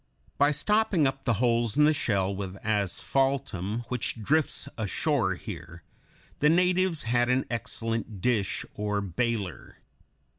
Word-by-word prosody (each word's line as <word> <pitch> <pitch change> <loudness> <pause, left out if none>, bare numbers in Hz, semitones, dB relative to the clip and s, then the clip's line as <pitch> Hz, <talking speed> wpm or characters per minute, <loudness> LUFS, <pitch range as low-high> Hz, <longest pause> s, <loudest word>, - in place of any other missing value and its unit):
By 145 - +5
stopping 195 +1 +2
up 135 0 -2
the 120 - +2
holes 115 0 +1
in 150 - +6
the 155 - +5
shell 100 -8 0
with 95 -1 -5
asphaltum, 110 +1 0
which 125 -2 -2
drifts 150 +8 +1
ashore 110 - 0
here, 85 -4 -9 0.6
the 150 - +4
natives 180 -1 +2
had 120 +1 +1
an 130 +1 +2
excellent 115 -2 -3
dish, 105 -2 0
or 105 0 -1
bailer. 100 0 -3
115 Hz, 125 wpm, -28 LUFS, 100-140 Hz, 0.6 s, in